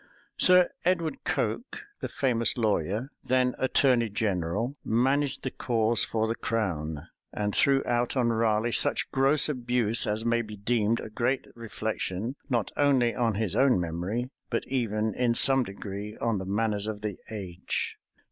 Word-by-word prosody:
Sir 180 -1 +6
Edward 170 -2 0
Coke, - - -2
the - - -3
famous 120 -5 +1
lawyer, 110 - 0
then 125 0 +2
attorney 130 -3 +3
general, 100 +3 -1
managed 135 +5 +1
the 130 - -2
cause 115 -1 +1
for 110 0 0
the 115 - 0
crown, 85 -11 -2 0.3
and 105 -1 -2
threw 135 -1 +4
out 120 +2 0
on 120 -2 +2
Raleigh 110 0 +1
such - - +1
gross 135 +2 +3
abuse, 120 -5 +1
as 110 +2 -1
may 115 0 +2
be 105 -2 -8
deemed 115 +1 +1
a 110 - -7
great 125 +4 0
reflection, 110 0 -4
not 120 -5 0
only 135 -5 +3
on 115 -4 0
his 105 -3 -1
own 135 -7 +4
memory, 90 +9 -3 0.2
but 115 - -1
even, 110 -4 -1
in 120 -2 +1
some 135 +2 +5
degree, 100 0 -6
on 115 -4 0
the 95 - -5
manners 105 0 0
of 105 -1 -4
the 105 -2 -4
age. 95 -4 -4
115 Hz, 155 wpm, -28 LUFS, 105-125 Hz, 0.3 s, Sir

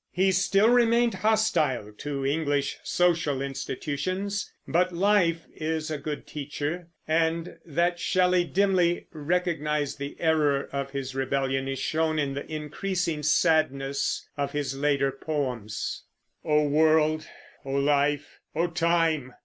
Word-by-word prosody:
He 190 +1 +2
still 195 +3 +3
remained 235 -1 +4
hostile 210 - +1
to 140 -2 -3
English 145 -1 0
social 165 -6 +1
institutions; 150 +9 -3 0.2
but 180 +2 +2
life 175 -3 +2
is 160 0 -3
a 150 - -2
good 150 +1 -5
teacher, 150 +4 -4 0.2
and 165 +1 0
that 170 +3 +1
Shelley 180 0 +3
dimly 180 -1 +2
recognized 150 -3 -1
the 140 0 -6
error 150 -4 +2
of 140 0 -3
his 135 -1 -5
rebellion 135 0 -1
is 135 0 -2
shown 155 +3 0
in 140 -2 0
the 140 +3 -6
increasing 160 +2 -2
sadness 145 -3 +1
of 140 -1 -2
his 140 -2 -2
later 140 -1 +1
poems: 130 -7 -3 0.4
O 150 -1 +3
world, 155 +1 +3 0.4
O 135 - -5
life, 145 +1 +1 0.2
O 165 +2 +2
time! 165 -6 +1
155 Hz, 125 wpm, -27 LUFS, 140-175 Hz, 0.4 s, remained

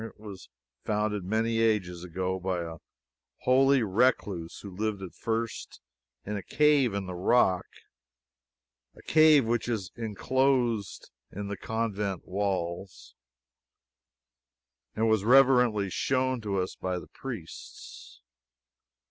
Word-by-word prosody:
It 115 -2 -10
was 105 -3 -10 0.3
founded 105 -2 -1
many 110 +4 0
ages 95 -6 0
ago 95 +1 -3
by 90 -1 -2
a 85 -1 -6 0.6
holy 135 0 +4
recluse 100 -5 0
who 100 -3 -9
lived 105 -1 -2
at 90 -5 -8
first 115 0 -4 0.5
in 105 - -3
a - - -4
cave 145 -4 +3
in 100 -1 -3
the 90 - -6
rock 95 0 +2 1.3
a - - -16
cave 155 -4 +5
which 120 +1 -1
is 105 -6 -3
inclosed 120 -1 0 0.2
in 100 0 -6
the 100 - -3
convent 105 -4 -3
walls, 95 -2 -3 1.8
now, 110 - -1
and - - +3
was 110 -3 +2
reverently 125 -5 +4
shown 130 +1 0
to 100 -3 -2
us 90 - -3
by 90 -1 -3
the - - -9
priests. - - -9
105 Hz, 120 wpm, -28 LUFS, 95-120 Hz, 1.8 s, cave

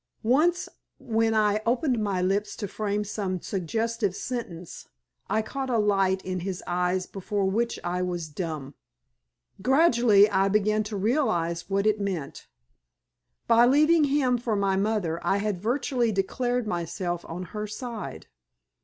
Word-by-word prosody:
Once, 315 +10 +2 0.3
when 225 -1 0
I 210 -1 +2
opened 240 0 +1
my 190 -3 0
lips 195 +3 0
to 205 - -4
frame 210 +1 -2
some 195 -3 -3
suggestive 210 +3 -2
sentence, 185 -10 -6 0.4
I 220 0 +1
caught 265 +3 -4
a 240 - +2
light 195 -3 +2
in 185 0 -2
his 185 +1 -4
eyes 180 +1 0
before 200 +1 -3
which 230 +5 0
I 180 +1 -1
was 175 -2 -2
dumb. 150 -3 -5 0.9
Gradually 235 - +5
I 195 -2 +2
began 215 +1 +2
to 210 -1 -4
realize 190 - 0
what 200 +1 +1
it 215 -1 +2
meant. 180 -8 -4 1.0
By 235 +1 +5
leaving 305 +4 +5
him 270 -3 +2
for 230 -2 -1
my 200 -1 +1
mother, 195 -5 0
I 195 - +2
had 200 -3 -2
virtually 245 +1 0
declared 245 +5 -1
myself 175 -2 -3
on 175 +2 -5
her 210 0 -3
side. 215 - -6
210 Hz, 145 wpm, -26 LUFS, 185-235 Hz, 1.0 s, Gradually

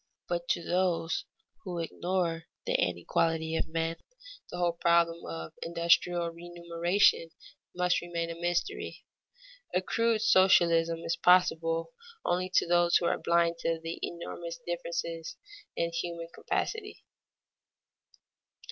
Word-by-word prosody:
But 175 0 -2
to 170 - 0
those 175 -2 0 0.4
who 180 -2 -5
ignore 170 0 -2 0.2
the - - 0
inequality 160 - 0
of - - -1
men, 165 +1 -2 0.5
the - - -6
whole 175 -1 +2
problem 170 0 +3
of 80 -1 -6
industrial 170 0 +2
remuneration 170 +1 +1 0.5
must 180 0 +2
remain 170 -1 -3
a - - -6
mystery. 175 0 -2 0.7
A - - +5
crude 230 +1 +1
socialism 170 -5 +4
is 165 0 -1
possible 165 +1 +3 0.3
only 180 +1 0
to - - +5
those 175 0 +4
who 175 - -2
are - - +1
blind 170 0 +2
to 165 -1 -1
the 165 +1 -6
enormous 170 +1 -6
differences 170 -1 -4 0.4
in 170 0 -1
human 170 0 -4
capacity. 435 -2 -3
170 Hz, 120 wpm, -30 LUFS, 165-175 Hz, 0.7 s, A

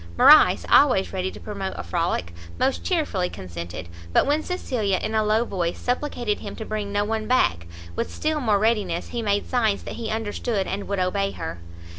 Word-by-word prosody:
Morrice, 305 +1 +7
always 250 -11 +4
ready 185 0 -1
to - - -10
promote 200 -3 -5
a 100 - -4
frolic, 85 0 -1 0.2
most 265 +1 0
chearfully 290 - 0
consented; 85 -2 -7 0.2
but - - +4
when 295 +2 +2
Cecilia, 240 - -1
in 215 - -3
a 220 0 +2
low 215 +2 +2
voice, 175 -6 -2
supplicated 245 -4 -1
him 200 - -7
to 220 - -6
bring 210 -2 -3
no 205 0 +1
one 220 0 -2
back, 85 - +2 0.3
with - - -2
still 310 0 -1
more 220 -7 +2
readiness 200 -5 0
he 240 - -3
made 205 -2 0
signs 220 -5 +1
that - - -7
he 230 -2 -4
understood 220 -1 -2
and 200 +2 -4
would 200 - -2
obey 195 +2 0
her. 80 +1 -6
210 Hz, 190 wpm, -24 LUFS, 190-235 Hz, 0.3 s, Morrice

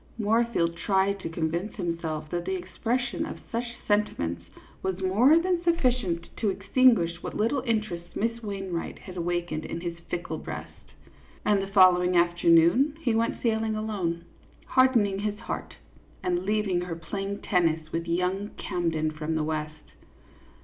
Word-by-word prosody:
Moorfield 220 -6 +1
tried 195 +1 +1
to 165 - -5
convince 170 +5 -2
himself 165 -4 -3
that 175 0 -2
the - - -1
expression 255 -5 -2
of 320 - -5
such 235 +1 -1 0.2
sentiments 85 - 0 0.4
was 190 -1 -2
more 215 +11 +5
than 355 +1 +2
suffi 335 -7 +3
cient 175 -9 -3
to 215 - +1
extinguish 195 -4 +3
what - - -6
little 235 +6 +1
interest 210 -7 -2
Miss 230 +2 -1
Wain 195 -4 -5
wright 165 - -3
had 185 - -11
awakened 175 -2 -2
in 170 - -5
his 170 -1 -5
fickle 175 - -3
breast; - - -9 0.5
and 205 -2 +3
the 195 - -3
following 180 -2 +5
afternoon 170 - +4
he 240 -8 +1
went 230 +1 0
sailing 220 -2 +1
alone, 190 -6 -2 0.4
hardening 230 -7 +3
his 205 0 -2
heart, 230 - -6 0.5
and 180 0 0
leaving 205 -3 +1
her 175 -2 -4
playing 195 +4 -4
tennis 160 -4 +1
with 165 +1 -2
young 180 +4 0
Camden 165 -4 -1
from 155 +1 -3
the 155 - +1
West. 155 0 -4
190 Hz, 150 wpm, -27 LUFS, 170-220 Hz, 0.5 s, more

